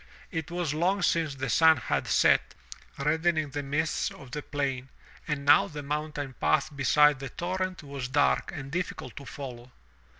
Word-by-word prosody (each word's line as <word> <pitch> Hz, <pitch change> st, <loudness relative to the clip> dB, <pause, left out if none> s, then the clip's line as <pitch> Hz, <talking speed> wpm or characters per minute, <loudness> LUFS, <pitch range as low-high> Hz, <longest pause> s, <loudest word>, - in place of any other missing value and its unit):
It 160 Hz, -2 st, -3 dB
was 170 Hz, -3 st, -2 dB
long 180 Hz, +5 st, +1 dB
since 160 Hz, -5 st, +1 dB
the 135 Hz, 0 st, -3 dB
sun 160 Hz, +6 st, +5 dB
had 120 Hz, -, -2 dB
set, -, -, +3 dB, 0.4 s
reddening 155 Hz, +1 st, +1 dB
the 145 Hz, +1 st, -3 dB
mists 145 Hz, +3 st, -1 dB
of 135 Hz, -3 st, -13 dB
the 150 Hz, -, -4 dB
plain 135 Hz, -3 st, -3 dB, 0.4 s
and 145 Hz, -3 st, -2 dB
now 195 Hz, +7 st, +6 dB
the 150 Hz, -5 st, -7 dB
mountain 150 Hz, -1 st, -3 dB
path 80 Hz, -, +1 dB
beside 150 Hz, +1 st, +4 dB
the 135 Hz, -, -6 dB
torrent 185 Hz, 0 st, -3 dB
was 140 Hz, -3 st, -5 dB
dark 65 Hz, -, +2 dB
and 135 Hz, -1 st, -7 dB
difficult 170 Hz, -7 st, -4 dB
to 140 Hz, -, -8 dB
follow. 125 Hz, -2 st, -8 dB
145 Hz, 165 wpm, -28 LUFS, 135-160 Hz, 0.4 s, now